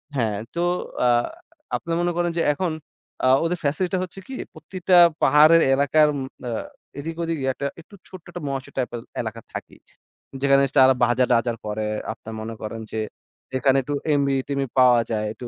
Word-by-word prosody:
হ্যাঁ 110 -5 0 0.2
তো - - -2 0.4
আ - - +3 0.7
আপনি 170 - -5
মনে 175 0 +1
করেন 175 0 +1
যে - - +2
এখন 175 +3 -2 0.5
আ - - +3 0.2
ওদের 170 +2 0
ফ্যাসিলিটি 155 +5 0
টা - - 0
হচ্ছে 185 +1 -8
কি 265 - -8 0.2
প্রতিটা 180 +3 -1 0.3
পাহাড়ের 155 +4 +6
এলাকার 145 +3 +4
উম 140 - -3 0.3
আ - - -2 0.5
এদিক 165 +3 -5
ওদিকে 165 -4 -2
একটা 140 - -5 0.2
একটু 200 - -17
ছোট্ট 185 -3 -12
একটা 175 - -7
মহেশ্বর 135 -1 -5
টাইপের 120 -2 -2 0.2
এলাকা 115 0 -6
থাকেই। - - -8 0.6
যেখানে 140 0 +4
স - - -16
তারা 130 0 +7
বাজার-টাজার 120 -1 +2
করে 105 0 -3 0.3
আপনারা 110 - -9
মনে 115 +1 -6
করেন 110 +1 -5
যে, 110 - -3 0.6
এখানে 135 +1 +3
একটু 145 +3 -4 0.2
এমবি-টেমবি 140 -1 0
পাওয়া 125 -2 +6
যায়, 110 -1 -1
একটু 120 +3 -8
140 Hz, 170 wpm, -23 LUFS, 120-165 Hz, 0.7 s, তারা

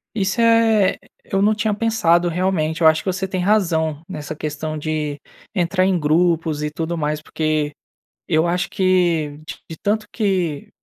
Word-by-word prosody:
Isso 195 +1 0
é 230 -3 +4
e - - -17 0.3
eu 195 0 +1
não 215 +1 +4
tinha 210 0 0
pensado 175 -6 +2
realmente. 170 -2 -1
Eu 160 - +4
acho 160 0 +5
que 190 - 0
você 190 +1 -3
tem 185 -1 -2
razão, 165 -6 +1
nessa 155 -4 -6
questão 155 0 -4
de 150 -1 -3 0.3
entrar 185 0 +1
em 190 -2 +2
grupos 160 0 +1
e 150 - -1
tudo 165 +2 -3
mais, 150 -1 -2
porque 155 -1 -1 0.6
eu 160 0 +2
acho 180 +2 -1
que 175 -6 +1 0.3
de 160 - -8
tanto 210 +1 0
que 185 -9 -1
170 Hz, 165 wpm, -20 LUFS, 155-195 Hz, 0.6 s, acho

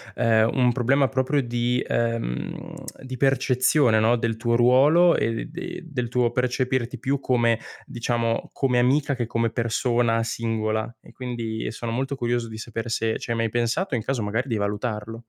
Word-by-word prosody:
ehm, 115 -1 +3
un 125 -2 +3
problema 135 +3 +2
proprio 130 +4 0
di 120 +1 -1
ehm, 115 - -2 0.3
di 130 -1 -7
percezione, 130 -1 +3
no, 115 +2 +3
del 115 -1 -1
tuo 115 0 0
ruolo 145 +9 +5
e 115 +1 -1
de 175 +3 -7
del 125 -6 -3
tuo 125 -1 +2
percepirti 125 0 -1
più 140 +1 -1
come 120 -4 +2 0.3
diciamo, 115 -1 -2
come 125 -3 +1
amica 140 +3 +2
che 120 - -2
come 115 0 0
persona 115 0 +1
singola. 110 0 -2
E - - -16
quindi 115 -3 -5
e - - -2
sono 115 +1 -5
molto 135 +3 -2
curioso 120 -2 -1
di 110 0 -8
sapere 115 0 -5
se 115 -1 0
ci - - -6
hai - - +1
mai 115 -1 0
pensato, 120 - -1
e - - +1
in 110 - -4
caso 130 -2 -1
magari 110 +6 -2
di 115 -4 -1
valutarlo. 105 +2 -3
120 Hz, 175 wpm, -24 LUFS, 115-130 Hz, 0.3 s, ruolo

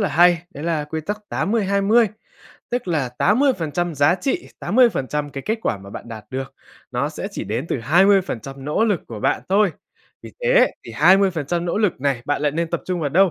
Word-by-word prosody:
là 200 - +1
hay, 175 +3 +4
đấy 145 - -7
là 160 -3 0
quy 160 +1 -4
tắc 210 +7 -4
80:20, 205 +2 +2 0.6
tức 245 -4 -2
là 150 -7 0
80% 175 - +1
giá 145 +4 +4
trị, 280 - -2
80% 150 - +1
cái 135 -1 -6
kết 220 +1 0
quả 105 - -1
mà 100 0 -12
bạn 120 - -9
đạt 110 -3 -8
được 135 +1 -5 0.4
nó 130 +3 -1
sẽ 155 +5 -6
chỉ - - -5
đến 115 +9 -3
từ - - -1
20% 150 - +2
nỗ 150 +10 +1
lực 205 -7 +1
của 110 -3 -7
bạn - - +1
thôi. 195 -2 +3 0.5
Vì - - -10
thế - - +5 0.2
thì - - -9
20% 175 -4 +3
nỗ 175 +3 -1
lực 205 -10 0
này 135 -3 0
bạn 145 0 -1
lại 150 - +2
nên 165 +1 -2
tập 170 - -1
trung 180 -2 -2
vào 145 - 0
đâu? 190 +3 +4
170 Hz, 205 wpm, -21 LUFS, 140-200 Hz, 0.6 s, thế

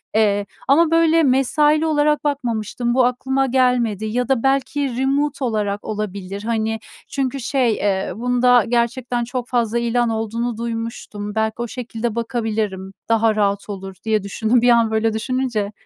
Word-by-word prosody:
Eee, 205 -2 +2 0.2
ama, 315 +4 +4
böyle, 330 0 +4
mesaili 295 +4 +3
olarak 300 -1 +2
bakmamıştım, 240 -4 -1
bu 255 -1 +4
aklıma 265 +2 0
gelmedi 245 -5 +1
ya 245 +3 -1
da 265 -3 +1
belki 270 -1 0
remote 275 +1 0
olarak 210 -3 -1
olabilir, 200 -1 -5
hani, 225 -1 -1 0.3
çünkü 275 -1 -2
şey, 250 -2 +1
eee, 195 -3 -1
bunda 245 +1 +3
gerçekten 240 +1 0
çok 245 +1 -4
fazla 235 -1 +1
ilan 235 0 +1
olduğunu 225 +1 -2
duymuştum, 225 -3 -5
belki 220 0 +1
o 240 - -2
şekilde 235 -2 -4
bakabilirim, 220 -5 -2 0.2
daha 225 -1 +3
rahat 200 0 0
olur 195 -1 -6
diye 215 -2 +1
düşündüm 220 +4 +1
bir 245 - +4
an, 230 -2 +4
böyle, 220 0 +1
düşününce. 225 -3 -1
235 Hz, 150 wpm, -20 LUFS, 220-255 Hz, 0.3 s, ama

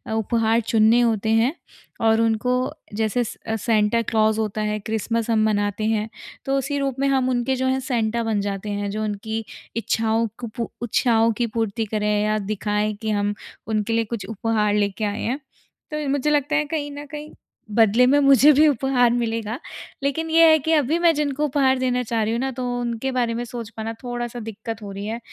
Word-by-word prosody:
उपहार 225 +1 +1
चुनने 225 +1 +4
होते 220 -2 +1
हैं 255 +7 +2 0.5
और 225 0 +4
उनको 225 +2 +1 0.4
जैसे 220 +3 0
स - - -6
अ, 220 - 0
सैंटा 220 +1 +2
क्लॉज़ 220 -1 +1
होता 215 0 -2
है 210 0 -1
क्रिसमस 220 +2 -2
हम 220 -1 +3
मनाते 205 0 0
हैं 215 +1 -2 0.4
तो 270 0 +1
उसी 275 +2 -2
रूप 275 -2 -1
में 275 - +2
हम 265 -2 +2
उनके 250 +1 0
जो 260 0 -1
हैं 260 0 +1
सैंटा 230 -1 0
बन 220 -2 0
जाते 200 +1 -4
हैं 205 0 -2
जो 215 +1 -3
उनकी 220 +2 -3 0.3
इच्छाओं 225 0 0
को 240 - -5
पू 235 - -3
इच्छाओं 230 -1 +2
की 240 - +1
पूर्ति 225 0 -1
करें 210 0 -1
या 215 0 +1 0.2
दिखाएँ 210 +1 -1
कि 220 - -2
हम 205 0 0 0.3
उनके 220 +1 -1
लिए 230 0 +1
कुछ 200 - -7
उपहार 220 -1 0
लेके 205 +1 0
आए 205 +1 -3
हैं। 255 +5 -2 0.5
तो 300 - -2
ये 300 -1 -3
मुझे 280 +1 +1
लगता 295 0 +1
है 305 0 +2
कहीं 290 -1 -3
न 290 - -7
कहीं 300 +1 -8 0.4
बदले 225 +2 +5
में 280 +3 +4
मुझे 275 +1 +7
भी 305 +3 +5
उपहार 255 -3 +2
मिलेगा 230 -1 -2 0.4
लेकिन 320 +4 -1
ये 330 +1 +6
है 315 - +6
कि 320 +4 -1
अभी 300 +1 +2
मैं 340 -1 +4
जिनको 295 0 0
उपहार 265 -2 +2
देना 250 -1 +1
चाह 230 -1 -1
रही 220 - -1
हूँ 235 - -1
ना, 265 +1 -1
तो 250 0 -4
उनके 240 +2 -2
बारे 240 -2 0
में 240 +1 -3
सोच 235 -2 -7
पाना 225 0 -5
थोड़ा-सा 240 -1 -4
दिक्कत 225 0 -6
हो 205 -1 -7
रही 200 +1 -6
है। 225 +2 -3
230 Hz, 205 wpm, -22 LUFS, 215-260 Hz, 0.5 s, मुझे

